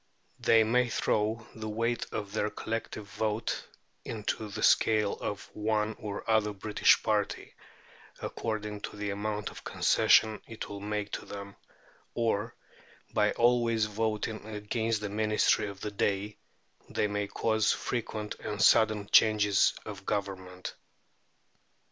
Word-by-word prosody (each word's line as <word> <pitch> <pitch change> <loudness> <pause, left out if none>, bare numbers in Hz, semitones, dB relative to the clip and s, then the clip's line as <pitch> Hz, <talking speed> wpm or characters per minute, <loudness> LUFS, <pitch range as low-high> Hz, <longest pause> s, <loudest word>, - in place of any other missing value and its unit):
They 115 -1 +5
may 120 +2 +2
throw 110 0 0
the 110 -1 -6
weight 115 +2 -1
of 105 -2 -4
their 105 -1 0
collective 110 -1 -4
vote 110 +2 -2 0.4
into 110 0 -3
the 105 +2 -5
scale 105 -2 +4
of 105 -1 -4
one 105 0 0
or 100 -1 -5
other 110 -2 +2
British 105 +2 +3
party, - - -1 0.7
according 105 -2 -4
to - - -6
the 105 -1 -2
amount 105 +1 -3
of - - -11
concession 110 -1 +3
it 115 -1 -6
will 100 - -7
make 105 0 -3
to - - -4
them, 100 0 -8 0.6
or, 115 -1 0 0.6
by 105 -1 +3
always 120 -2 +3
voting 110 0 -2
against 110 +1 -2
the 105 - -3
Ministry 105 0 +2
of 100 -1 -8
the 105 - -3
day, 100 +1 -1 0.5
they - - 0
may 105 0 -1
cause 110 +1 +1
frequent 110 -3 -3
and 105 -1 -5
sudden 110 0 +4
changes 105 -2 +5
of 100 -2 -8
Government. 95 -2 -3
105 Hz, 130 wpm, -30 LUFS, 105-110 Hz, 0.7 s, They